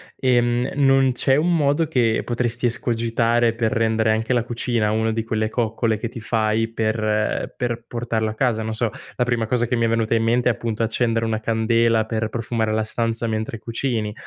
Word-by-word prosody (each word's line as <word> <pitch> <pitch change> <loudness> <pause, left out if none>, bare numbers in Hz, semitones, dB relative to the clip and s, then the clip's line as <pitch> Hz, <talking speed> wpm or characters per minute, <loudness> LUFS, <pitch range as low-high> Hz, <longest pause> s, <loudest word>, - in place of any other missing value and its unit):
ehm, 120 -1 +2
e - - -5
non 135 -2 +4
c'è 130 +2 +3
un 170 +4 +2
modo 150 +1 +2
che 120 -7 +1
potresti 120 0 -2
escogitare 115 0 +1
per 115 -1 -1
rendere 110 -1 +1
anche 110 +3 0
la 120 -2 +2
cucina 120 -2 -1
una 110 +1 +1
di 115 0 -2
quelle 110 -1 -1
coccole 115 -1 0
che 115 - -4
ti 120 - -8
fai 110 0 0
per 110 -1 -1
per 120 -1 -3
portarla 115 -2 -2
a - - -7
casa? 110 -2 0
Non 110 0 -3
so, 110 +1 0 0.3
la 125 - +1
prima 120 -2 0
cosa 120 +1 0
che 125 - 0
mi 115 -1 +1
è - - +2
venuta 115 0 +1
in 115 - +1
mente 120 +2 +2
è - - +5
appunto 115 -1 -4
accendere 115 0 0
una 110 -1 -1
candela 115 0 +2
per 110 -1 -2
profumare 115 -1 -2
la 110 0 +1
stanza 115 +1 -2
mentre 110 0 -3
cucini, 115 -2 -2
115 Hz, 200 wpm, -22 LUFS, 110-120 Hz, 0.3 s, è